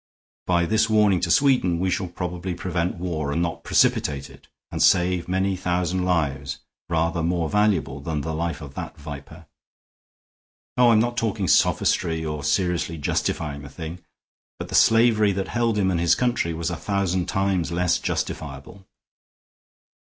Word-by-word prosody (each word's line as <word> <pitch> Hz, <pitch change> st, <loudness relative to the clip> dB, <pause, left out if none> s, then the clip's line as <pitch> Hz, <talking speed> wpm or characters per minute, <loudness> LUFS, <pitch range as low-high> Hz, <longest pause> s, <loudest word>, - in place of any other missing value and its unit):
By 85 Hz, -1 st, +2 dB
this 110 Hz, +4 st, +2 dB
warning 105 Hz, -4 st, +4 dB
to -, -, -2 dB
Sweden 125 Hz, -11 st, +3 dB
we 95 Hz, +1 st, 0 dB
shall 95 Hz, +1 st, -1 dB
probably 90 Hz, +1 st, -5 dB
prevent 90 Hz, -1 st, -2 dB
war 80 Hz, -5 st, -3 dB
and 80 Hz, -, -1 dB
not 85 Hz, -1 st, -2 dB
precipitate 70 Hz, -2 st, +1 dB
it, -, -, -18 dB, 0.2 s
and -, -, -3 dB
save 90 Hz, 0 st, +3 dB
many 95 Hz, +1 st, 0 dB
thousand 90 Hz, 0 st, -1 dB
lives 70 Hz, -6 st, -1 dB, 0.3 s
rather 85 Hz, 0 st, 0 dB
more 85 Hz, -1 st, -1 dB
valuable 95 Hz, -10 st, +1 dB
than 75 Hz, +1 st, -3 dB
the 80 Hz, +2 st, -4 dB
life 85 Hz, +1 st, -3 dB
of 70 Hz, -3 st, -9 dB
that -, -, -7 dB
viper. 75 Hz, +3 st, -10 dB, 1.3 s
Oh, 125 Hz, -1 st, +5 dB
I'm 110 Hz, -2 st, +5 dB
not 120 Hz, +1 st, 0 dB
talking 110 Hz, -4 st, -1 dB
sophistry 80 Hz, -2 st, +2 dB
or 75 Hz, -2 st, -4 dB
seriously 85 Hz, +1 st, 0 dB
justifying 70 Hz, 0 st, -2 dB
the 70 Hz, -, -10 dB
thing, 80 Hz, +4 st, -7 dB, 0.6 s
but -, -, -7 dB
the -, -, -8 dB
slavery 115 Hz, -3 st, +4 dB
that 95 Hz, 0 st, -3 dB
held 115 Hz, -2 st, 0 dB
him 95 Hz, -2 st, +2 dB
and 85 Hz, -, 0 dB
his 85 Hz, 0 st, +3 dB
country 120 Hz, -9 st, 0 dB
was 85 Hz, +1 st, -2 dB
a -, -, -2 dB
thousand 95 Hz, -3 st, -1 dB
times 95 Hz, -4 st, 0 dB
less 90 Hz, +1 st, +1 dB
justifiable. 80 Hz, +6 st, -5 dB
90 Hz, 160 wpm, -23 LUFS, 80-95 Hz, 1.3 s, Oh